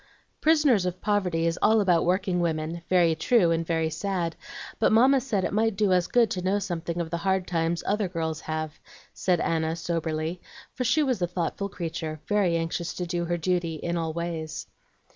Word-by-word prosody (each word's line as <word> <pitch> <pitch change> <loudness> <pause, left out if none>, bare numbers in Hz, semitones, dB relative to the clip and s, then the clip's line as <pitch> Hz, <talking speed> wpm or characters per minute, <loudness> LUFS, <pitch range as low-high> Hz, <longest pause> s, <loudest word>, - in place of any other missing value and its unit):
"'Prisoners 300 - +4
of 180 0 -4
Poverty' 185 -6 0
is 165 0 0
all 220 +1 +5
about 180 -5 +3
workingwomen, 170 -3 0
very 175 -3 +4
true 175 +2 +3
and 165 0 0
very 160 -1 0
sad; 170 0 -2 0.4
but - - +3
Mamma 260 +4 +5
said 215 -7 -1
it 180 - -2
might 220 0 +2
do 200 -2 +2
us 180 -1 +2
good 235 -4 +3
to 180 - -2
know 190 +3 +1
something 175 -3 -3
of 165 -2 -3
the 170 - -1
hard 190 +1 0
times 165 -1 -1
other 205 0 0
girls 160 -3 -3
have," 155 -1 -4 0.3
said 180 -3 +1
Anna, 160 -1 0
soberly; 165 0 -3 0.3
for 255 - -2
she 250 +6 +3
was 255 -8 0
a 175 - +2
thoughtful 180 +3 -3
creature, 165 -4 -5
very 200 -5 +2
anxious 165 +1 -3
to 180 - -3
do 175 0 -2
her 175 0 -1
duty 175 -1 -1
in 170 +3 -3
all 165 -1 -1
ways. 160 -1 -4
175 Hz, 190 wpm, -26 LUFS, 165-195 Hz, 0.4 s, all